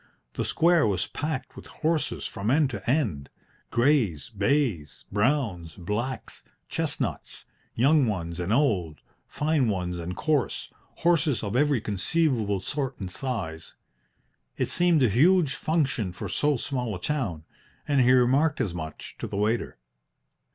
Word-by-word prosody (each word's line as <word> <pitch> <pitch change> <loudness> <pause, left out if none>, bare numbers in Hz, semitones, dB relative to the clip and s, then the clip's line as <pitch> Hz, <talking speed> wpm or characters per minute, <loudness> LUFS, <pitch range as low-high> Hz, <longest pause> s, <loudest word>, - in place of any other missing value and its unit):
The - - -2
square 170 -4 +3
was 95 -3 0
packed 150 -2 -4
with - - -11
horses 160 -1 -1
from 100 +1 -3
end 140 +1 +3
to - - -5
end 110 - 0 0.4
greys, 120 - +1
bays, 100 - 0
browns, 105 - 0
blacks, 105 +8 -4 0.2
chestnuts - - -3 0.3
young 140 +2 +4
ones 85 -5 -3
and 90 +3 -2
old, 100 - +1 0.3
fine 150 -5 +1
ones 90 -3 -2
and 85 +2 -5
coarse, 150 -8 -1 0.2
horses 165 -7 +2
of 105 +1 -3
every 140 -2 +3
conceivable 110 - +1
sort 135 +4 -3
and 95 -3 -5
size. 95 -11 -5 0.8
It - - 0
seemed 175 -4 +3
a - - +6
huge 155 - +4
function 140 - 0
for 90 - -6
so 145 -2 +1
small 125 -4 -2
a - - -7
town, 105 - -2 0.4
and 140 -2 +3
he 125 0 +5
remarked 135 +5 +3
as 95 - -1
much 80 -3 -7
to - - -4
the - - -5
waiter. 110 +3 0
120 Hz, 140 wpm, -26 LUFS, 95-145 Hz, 0.8 s, a